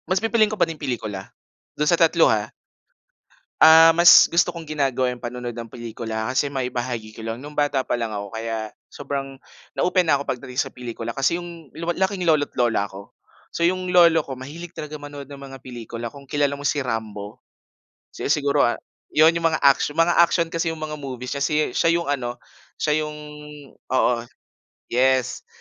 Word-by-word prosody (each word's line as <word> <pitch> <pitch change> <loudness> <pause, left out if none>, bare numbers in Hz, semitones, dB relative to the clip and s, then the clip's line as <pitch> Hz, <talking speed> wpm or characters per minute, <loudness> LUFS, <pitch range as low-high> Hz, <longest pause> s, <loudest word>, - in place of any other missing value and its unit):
Mas 185 +1 +1
pipiliin 225 -1 +3
ko 215 - -4
pa 180 - +4
din 165 -2 -8
pelikula, 110 -8 -4 0.5
do'n 150 0 +1
sa 170 - +3
3 165 -1 +5
ha. - - 0 1.1
Ah, 160 +1 +9
mas 170 +1 +8
gusto 170 +1 +2
kong 170 -2 -7
ginagawa 135 -4 0
yung 125 - -13
panonood 120 0 -5
ng 115 0 -8
pelikula 110 -1 -5
kasi 140 +2 +1
maibahagi 125 -4 -4
ko 110 - -10
lang, 115 +1 -4
nung 145 +4 -10
bata 145 -3 0
pa - - -2
lang 115 -2 -1
ako 100 0 -6
kaya 110 -1 -4 0.2
sobrang 135 -1 -5 0.4
na-open 185 +1 +3
na 140 - +5
ako 140 - -6
pagdating 125 0 -5
sa 135 -1 -1
pelikula 115 -2 -6
kasi 135 +6 +1
yung 170 -4 -10
lu 170 +1 -2
laking 190 0 -1
lolo't 155 -3 +2
lola 115 -4 +1
ko. 100 +1 -12 0.4
So - - -4
yung 180 +1 +1
lolo 170 -3 +5
ko 135 - -6
mahilig 150 +7 -9
talaga 150 0 -7
manood 145 -1 -9
ng 140 - -9
mga 135 -1 -11
pelikula 120 -2 -7
kung 140 +2 -14
kilala 145 0 0
mo 145 - -8
si 145 0 +1
Rambo? 110 -4 -5 0.7
Si - - -5
siguro, 145 -2 +2
ah, 120 - 0 0.4
yun 155 +2 +7
yung 165 0 +1
mga, 155 -2 -1 0.3
mga 165 +1 +3
action 170 -1 +3
kasi 165 -1 -1
yung 155 - -7
mga 150 -1 -5
movies 130 -3 -6
si 150 0 +1
siya 165 - +2
yung 170 -4 -1
ano, 120 -3 -2 0.4
siya 150 0 +1
yung 150 - -7 0.6
oo. 125 -1 +1 0.8
Yes, 130 +1 +1
140 Hz, 185 wpm, -23 LUFS, 120-160 Hz, 1.1 s, Ah